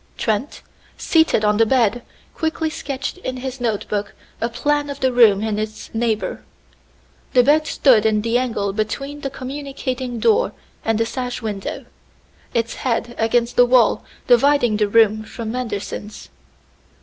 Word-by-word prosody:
Trent, 225 +5 -2 0.3
seated 320 -10 +2
on 210 0 +3
the 225 - +5
bed, 240 -2 +2 0.3
quickly 320 0 -2
sketched 275 +4 -5
in 255 -8 -4
his 260 0 -6
notebook 210 -3 -2 0.3
a 230 - 0
plan 290 +4 0
of 280 0 -6
the 260 -2 +1
room 215 -4 +5
and 215 -1 -1
its 215 0 -6
neighbor. 225 -1 -1 0.9
The 250 - +6
bed 305 +4 +3
stood 245 -7 +4
in 215 -1 +2
the 230 +1 -1
angle 215 -6 -2
between 275 +7 -3
the 275 - -3
communicating 260 -2 -5
door 445 - +2 0.3
and 225 -1 +1
the 225 - +1
sash 250 0 -4
window, 205 -3 -4 0.7
its 230 -1 -1
head 240 -1 -1
against 235 +1 +1
the 245 - +7
wall 245 -3 +4 0.2
dividing 245 -2 +4
the 210 -1 +2
room 215 0 +4
from 220 0 -6
Manderson's. 215 -3 -5
240 Hz, 150 wpm, -20 LUFS, 220-265 Hz, 0.9 s, the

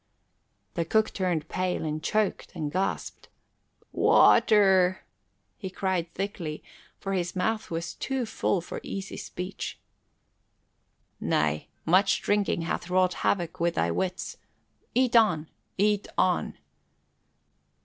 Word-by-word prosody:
The 170 - 0
cook 220 +6 +1
turned 175 -5 -1
pale 185 -2 -1
and 155 0 -2
choked 215 +4 -1
and 155 -3 -3
gasped. 190 +3 -2 0.6
"Water!" 190 -3 +5 0.6
he 190 - -5
cried 185 -3 -1
thickly, 175 -6 -4 0.4
for 195 -1 -3
his 175 -1 -1
mouth 215 +4 -1
was 170 0 -3
too 265 -2 -2
full 200 -4 0
for 175 - -6
easy 195 0 -6
speech. 180 +2 -6 1.4
"Nay, 75 0 0 0.2
much 185 +4 +4
drinking 205 -4 +1
hath 170 +1 -3
wrought 185 0 +3
havoc 175 -4 0
with 170 0 +1
thy 85 +1 +1
wits. 185 - -3 0.6
Eat 250 -1 +3
on, 180 -9 +4 0.3
eat 205 +1 +2
on!" - - +1
185 Hz, 115 wpm, -27 LUFS, 170-200 Hz, 1.4 s, Water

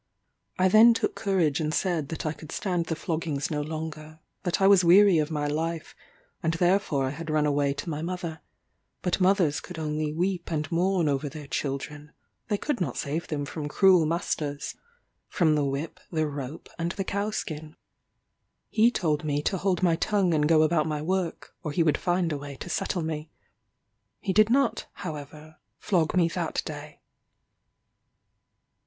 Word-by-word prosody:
I 185 - +4
then 225 +4 +7
took - - 0
courage 180 -8 +1
and 155 -1 -1
said 160 -3 0
that 160 - -5
I 155 - 0
could 160 -1 -11
stand 175 -4 -1
the 165 - -1
floggings 155 -4 -2
no 150 -1 0
longer; 155 0 -6 0.2
that 175 -1 -1
I 195 - +3
was 195 -2 +6
weary 185 0 +7
of 150 0 0
my 150 -2 -2
life, 160 +2 -3 0.5
and 165 -1 0
therefore 175 -5 +2
I 130 - -1
had 165 +3 -7
run 155 -1 +2
away 145 -1 +1
to 145 - -6
my 155 -2 -3
mother; 170 -2 -4 0.6
but 180 +1 0
mothers 180 -6 +3
could 180 - -10
only 155 -1 -2
weep 175 +2 -1
and 150 -2 -2
mourn 175 0 +2
over 145 0 0
their 150 0 -9
children, 145 +2 -4 0.3
they 210 - 0
could 275 -1 -2
not 140 -8 -2
save 155 +4 -3
them 145 -2 -2
from 150 0 -5
cruel 180 0 +5
masters 150 -3 -2 0.5
from 160 -5 +2
the 150 -1 +2
whip, 140 +4 -3
the 155 -2 +1
rope, 140 0 -6
and 170 +1 -1
the 195 - -3
cow 200 +2 -1
skin. 155 -6 -5 0.9
He 225 +2 +4
told 155 -10 0
me 145 -1 -1
to 190 - 0
hold 190 0 0
my 170 -2 +3
tongue 195 -3 +1
and 150 -1 +2
go 160 -1 +6
about 155 -1 +2
my 150 -1 -2
work, 185 0 -2
or 155 -5 -4
he 165 +3 +2
would 155 -2 +3
find 175 -2 +1
a 145 - -2
way 140 0 -7
to 175 - -8
settle 175 -4 -1
me. 155 -1 -4 0.9
He 190 - -2
did 215 +2 +5
not, 275 +3 +2 0.2
however, 155 0 -8 0.2
flog 175 -6 +1
me 170 -2 +5
that - - -2
day. - - -8
160 Hz, 180 wpm, -27 LUFS, 150-180 Hz, 0.9 s, then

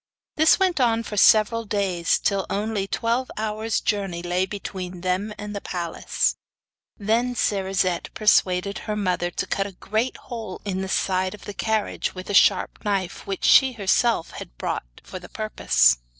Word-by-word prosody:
This 315 +1 +5
went 370 -5 +1
on 230 -2 +2
for 210 - -6
several 215 +3 +5
days, 195 -5 0
till 195 -2 -1
only 205 -1 -2
twelve 235 +5 -1
hours 220 +1 -1
journey 195 -5 -2
lay 180 +2 0
between 185 -3 -6
them 185 +4 -1
and 210 0 -6
the 200 - -4
palace. 170 -2 -1 0.6
The 235 +4 0
Cerisette 190 -5 0
persuaded 200 -2 +2
her 210 - 0
mother 180 -4 0
to - - -3
cut 195 0 -1
a 200 - -11
great 220 +7 -2
hole 225 -6 -7
in 190 -2 -2
the 190 - -4
side 185 0 0
of 210 - -15
the 205 - -6
carriage 220 -1 -1
with 185 +2 -6
a - - -3
sharp 195 -1 +3
knife 195 -3 -2
which 195 -1 -4
she 265 -1 +6
herself 225 -1 +1
had - - -10
brought - - -5
for 185 - -8
the 180 - -13
purpose. 140 - +2
200 Hz, 165 wpm, -24 LUFS, 185-220 Hz, 0.6 s, she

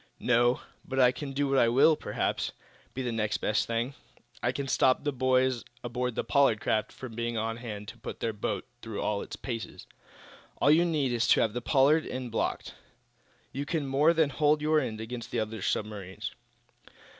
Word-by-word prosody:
"No; 120 0 +3 0.2
but 135 0 -3
I 125 -1 +6
can 135 +2 -6
do 140 +1 0
what 120 -4 +3
will, 145 +5 +6
perhaps, - - -2 0.4
be 130 - -2
the 120 - -1
next 110 -2 0
best 105 - 0
thing. 115 +3 -1 0.5
I 125 - +1
can 140 +1 -4
stop 130 0 +3
the 145 -1 -1
boys 130 -1 +2 0.2
aboard 125 0 -2
the - - -1
Pollard 140 -7 +3
craft 110 0 0
from 130 -3 -9
being 115 0 -2
on 115 +1 -2
hand 105 -4 -7
to - - -11
put - - -7
their 115 - -1
boat 105 - -3 0.2
through 110 -2 -6
all 105 -1 -1
its - - -7
paces. 115 -7 -6 0.7
All 145 - +5
you 165 +3 +5
need 150 -6 +1
is 120 -1 +1
to - - +5
have 110 - +1
the 120 - -3
Pollard 145 +5 +3
end 125 -2 -5
blocked. 115 - -2 0.8
You 140 - -3
can 150 0 -2
more 140 +4 +4
than 160 -3 +2
hold 150 +2 +3
your 155 +1 +3
end 110 -6 -3
against 115 +1 -6
the 120 - -1
other 110 -1 -3
submarines." 100 -3 -3
125 Hz, 190 wpm, -29 LUFS, 115-140 Hz, 0.8 s, I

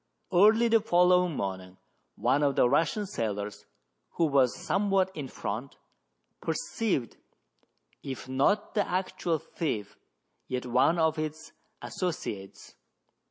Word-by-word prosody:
Early 215 +6 +6
the 225 -1 +4
following 180 -4 +3
morning 95 -3 -4 0.4
one 145 - +1
of 140 -2 +2
the - - +4
Russian 165 - +1
sailors, 105 - -4 0.5
who 170 - +2
was 135 -4 +3
somewhat 195 -1 +1
in 145 -3 -5
front, 120 +2 -5 0.6
perceived, 165 - -2 0.8
if 130 -2 -7
not 140 +11 +1
the 205 -2 0
actual 180 -2 -1
thief, 115 - -4 0.5
yet 125 0 -3
one 125 +7 +3
of 160 -1 +2
its 155 +1 -5 0.3
associates. 105 - -5
160 Hz, 115 wpm, -29 LUFS, 125-185 Hz, 0.8 s, Early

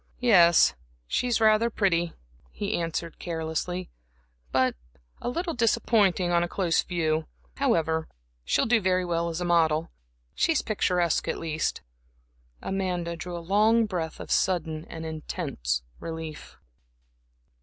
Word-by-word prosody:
"Yes, 175 -9 +6 0.3
she's 240 - 0
rather 220 +1 +4
pretty," 175 -6 +1 0.4
he 205 +1 -3
answered, 165 0 -3
carelessly 170 +2 -3 0.6
"but 130 -1 +2 0.5
a - - -2
little 335 +6 -2
disappointing 215 -6 +2
on 170 0 +3
a 175 - 0
close 175 -2 +1
view. 160 -3 -1 0.3
However, 165 - +1 0.4
she'll - - +2
do 225 -1 +3
very 185 -1 +1
well 170 -1 0
as 165 +1 -4
a - - -1
model 165 -2 +2 0.4
she's 325 -3 +1
picturesque, 180 -6 +1
at - - -1
least." 155 -1 -2 0.8
Amanda 180 -3 -2
drew 175 +1 -6
a 170 - -8
long 220 +4 +4
breath 170 -6 -4
of - - -7
sudden 160 -4 0
and 165 -1 -8
intense 65 - -3 0.2
relief. 160 -2 -7
175 Hz, 125 wpm, -27 LUFS, 160-200 Hz, 0.8 s, Yes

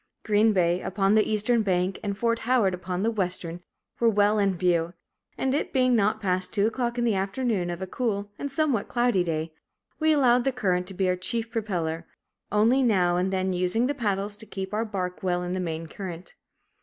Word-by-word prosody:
Green 215 +1 +3
Bay, 180 -2 +2
upon 195 +1 +1
the 215 -1 +3
eastern 220 +2 +2
bank 185 -2 0
and 200 -1 -3
Fort 230 +1 +1
Howard 230 -6 +2
upon 180 +1 -3
the 225 - +2
western, 180 -4 -2 0.4
were 235 - +4
well 210 0 +3
in 195 -3 +1
view; 175 -1 +1 0.4
and, 265 0 0
it 290 - -1
being 255 -2 +3
not 215 0 +2
past 185 -3 -1
two 205 -1 +1
o'clock 240 +1 -1
in 240 - 0
the 230 -2 +2
afternoon 195 -1 -1
of 175 +2 -4
a - - -2
cool 205 -1 -2
and 285 - -4
somewhat 275 -7 0
cloudy 240 -6 +2
day, 160 -1 -3 0.5
we 315 0 +3
allowed 250 -5 +4
the 270 - +1
current 185 -8 0
to 190 - -7
be 190 0 +1
our 180 - +2
chief 225 +5 -2
propeller, 170 -8 -2 0.4
only 225 +6 +4
now 185 -8 +3
and 180 +2 0
then 190 0 0
using 180 +6 +1
the 280 - 0
paddles 205 -5 -1
to 220 +1 -12
keep 190 +1 -6
our 220 +2 0
bark 185 -4 -4
well 180 -1 0
in 180 0 -3
the 185 - -2
main 165 -2 -3
current. 175 +1 -8
200 Hz, 205 wpm, -26 LUFS, 180-230 Hz, 0.5 s, were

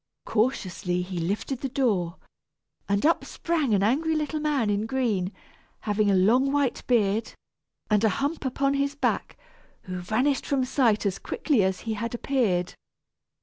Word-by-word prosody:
Cautiously 185 -6 0
he 180 -1 -5
lifted 205 +9 -2
the 270 - -2
door, 200 -11 0 0.7
and 200 +4 +1
up 330 - +3
sprang 320 -7 -1
an 195 - +2
angry 310 +9 +2
little 310 0 -1
man 290 -8 +1
in 205 +2 -1
green, 225 -8 0 0.5
having 210 -1 +1
a 195 - +4
long 240 +9 +4
white 280 -3 0
beard, 220 -2 +1 0.5
and 210 0 +2
a 220 - +5
hump 285 - -2
upon 275 +1 0
his 280 0 0
back, 285 - -1 0.5
who 180 -1 -5
vanished 250 +10 0
from 270 -2 +1
sight 235 -5 +2
as 195 -2 -1
quickly 280 -9 0
as 190 0 0
he 225 - -3
had 230 +2 -3
appeared. 220 -10 0
230 Hz, 155 wpm, -26 LUFS, 200-275 Hz, 0.7 s, a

